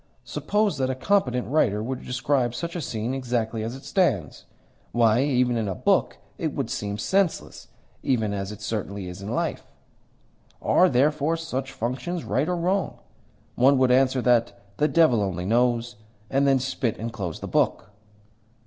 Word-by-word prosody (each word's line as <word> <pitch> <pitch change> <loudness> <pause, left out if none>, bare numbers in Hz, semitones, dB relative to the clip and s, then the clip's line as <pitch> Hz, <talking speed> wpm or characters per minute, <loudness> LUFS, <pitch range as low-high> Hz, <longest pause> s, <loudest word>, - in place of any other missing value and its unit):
Suppose 205 -8 0
that 130 -1 +1
a 130 - -1
competent 130 -5 +1
writer 110 -7 +1
were 130 +3 -2
to - - -11
describe 125 -1 0
such 170 0 -4
a 175 - -2
scene 115 -2 -3
exactly 120 -4 -2
as 115 +3 -4
it 135 - -12
stands? 135 - 0 0.5
Why, 115 0 +4
even 125 -3 +2
in 110 -2 -1
a 95 - -2
book - - +1 0.2
it - - -2
would - - -2
seem 100 0 -3
senseless, 190 - -1 0.3
even 110 -5 0
as 100 0 -3
it 105 - -10
certainly 100 -3 -4
is 90 +2 -8
in 100 - -6
life. 120 - -2 1.0
Are, 185 - +4
therefore, 150 +5 +2
such 135 -5 -4
functions 130 +9 -3
right 140 +7 0
or 180 - +1
wrong? 180 0 0 0.6
One 135 +3 +4
would 130 -1 +3
answer 130 0 +3
that 120 -1 +2 0.2
the 150 - +3
devil 155 -11 +4
alone 90 -2 -3
knows, 120 0 +1 0.3
and 135 +1 +3
then 135 -1 +5
spit 130 -3 -2
and 115 +1 -5
close 90 -6 -4
the - - -6
book." 100 - 0
125 Hz, 170 wpm, -25 LUFS, 110-140 Hz, 1.0 s, then